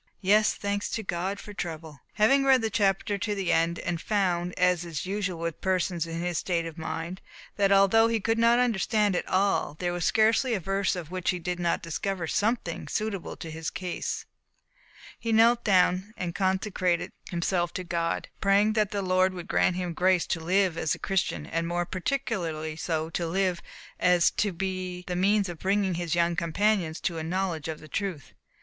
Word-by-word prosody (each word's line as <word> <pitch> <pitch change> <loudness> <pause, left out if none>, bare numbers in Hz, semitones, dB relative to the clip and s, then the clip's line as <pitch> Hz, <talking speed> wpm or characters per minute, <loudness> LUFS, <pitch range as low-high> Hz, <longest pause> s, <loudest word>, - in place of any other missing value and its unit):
Yes, 210 +2 +4
thanks 205 0 -2
to 220 - -5
God 190 +2 -2
for 210 - -9
trouble!" 160 -5 -6
Having 270 +6 +4
read 265 -3 +4
the 220 - 0
chapter 200 -1 +1
to 210 0 -1
the 195 -3 -1
end, 165 +1 +2
and 170 -1 -3
found, 180 -4 0
as 180 -2 +3
is 160 -5 -5
usual 195 -2 -2
with 170 -1 -4
persons 180 -3 0
in 165 0 -4
his 175 -1 -1
state 170 -2 -1
of 165 -2 -6
mind, 165 +2 -5 0.3
that 200 -1 +2
although 195 +3 +5
he 230 -1 +1
could 225 +2 0
not 235 +1 +5
understand 215 -4 +2
it - - -2
all, 190 -5 +1
there 175 +1 -1
was 175 -1 -3
scarcely 225 +4 +3
a - - -1
verse 195 +1 0
in 175 -2 -5
which 180 +3 -3
he 180 - +1
did 180 +1 -3
not 170 -1 0
discover 175 +2 -3
something 220 +8 -1
suitable 215 -4 -3
to 165 - -7
his 160 0 -4
case, 180 -2 -4 0.9
he 230 - -2
knelt 230 +2 +5
down 190 +2 +2
and 175 -2 -3
consecrated 185 -2 0 0.2
himself 175 0 0
to 185 - -4
God; 170 -1 -2
praying 200 +2 +4
that 215 -2 +2
the 200 -2 -2
Lord 185 0 +2
would 175 0 -7
grant 185 -4 +2
him 180 -2 -3
grace 185 0 +2
to 170 - -2
live 180 +1 +1
as 160 - 0
a - - -11
Christian, 175 - -1
and 165 - -2
more 175 +1 -1
particularly 175 - -2
so 160 0 -2
to 170 0 -2
live, 185 0 0 0.4
as 180 -1 +4
to 205 - 0
be 185 0 -4
the 180 - -3
means 200 +2 +2
of 175 -3 -7
bringing 195 -1 +1
his 170 0 -2
young 170 0 +2
companions 170 0 0
to 170 -3 -2
a - - -4
knowledge 170 -2 -2
of 160 -1 -5
the 155 - -12
truth. 180 - -4
185 Hz, 195 wpm, -27 LUFS, 170-200 Hz, 0.9 s, although